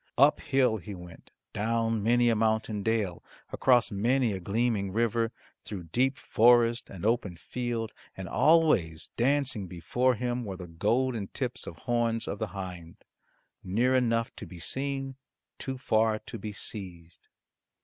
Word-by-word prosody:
Up 140 +3 +6
hill 130 -5 +2
he 100 +1 -8
went, 90 -2 -12 0.2
down 115 +1 0
many 120 +3 +4
a 115 - +3
mountain 110 -1 0
dale, 105 -4 -1 0.3
across 125 -4 +3
many 115 +3 +2
a 95 - -3
gleaming 100 +1 0
river, 115 +1 +1 0.3
through 100 -4 -6
deep 130 +5 +2
forest 120 -1 +4
and 95 0 -7
open 110 -5 +1
field, 120 +2 -3 0.3
and 95 -1 -5
always 150 - +3
dancing 130 -5 +1
before 120 +9 0
him 125 +1 -2
were 95 -4 -5
the 90 - -7
golden 110 +6 0
tips 125 +2 -4
of - - -6
horns 115 -2 0
of 100 - -4
the 110 - -1
hind 90 -3 -8 0.6
near 115 +8 +2
enough 115 -2 +1
to 100 - -8
be 90 - -11
seen, 135 - -3 0.4
too 130 -1 -4
far 110 -2 +2
to 115 - -9
be 105 +2 -5
seized. 90 -5 -8
115 Hz, 150 wpm, -29 LUFS, 100-125 Hz, 0.6 s, Up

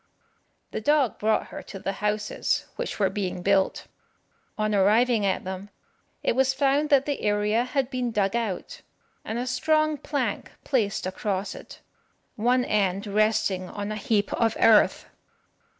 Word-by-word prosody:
The - - -4
dog 285 -1 +2
brought 215 +1 +1
her - - -7
to 195 - -9
the 195 0 -3
houses 210 +1 -1
which - - -4
were - - +1
being 185 -3 -3
built. 195 0 +1 0.7
On 215 0 0
arriving 210 +2 +3
at 190 - -1
them, 190 +2 -6 0.5
it - - +1
was 265 0 +2
found 285 +2 +2
that 275 -1 +4
the 285 -1 -2
area 210 +2 +1
had 260 0 -1
been 250 -2 -1
dug 205 -1 0
out, 225 -6 -3 0.4
and 220 - -4
a 245 - -2
strong 310 +4 +1
plank 260 -8 -3
placed 220 -10 0
across 190 +1 -2
it, - - -12 0.5
one 245 +2 +2
end 200 -1 0
resting 210 -3 +1
on 205 0 -5
a - - -3
heap 210 -1 0
of 225 -1 +1
earth. 220 -2 +5
215 Hz, 150 wpm, -26 LUFS, 200-255 Hz, 0.7 s, earth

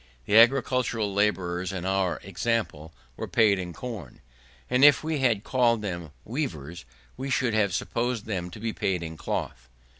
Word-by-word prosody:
The 105 - +1
agricultural 115 -3 +4
labourers, 95 -3 0
in 90 -2 -5
our 95 -2 0
example, 100 -5 -2 0.2
were - - -5
paid 105 -4 +3
in 90 -1 -5
corn, 105 - -8 0.5
and 125 +2 +2
if 145 -1 +7
we 155 -1 -1
had 115 -6 +2
called 120 -4 +2
them 85 -5 -4 0.2
weavers, 85 - -4 0.3
we 135 +1 -4
should 125 -3 +1
have 105 -3 +2
supposed 120 +4 -2
them 90 -5 -3
to 90 - -10
be 110 0 -3
paid 90 -3 -1
in 80 -1 -6
cloth. 65 -4 -4
105 Hz, 160 wpm, -26 LUFS, 90-120 Hz, 0.5 s, if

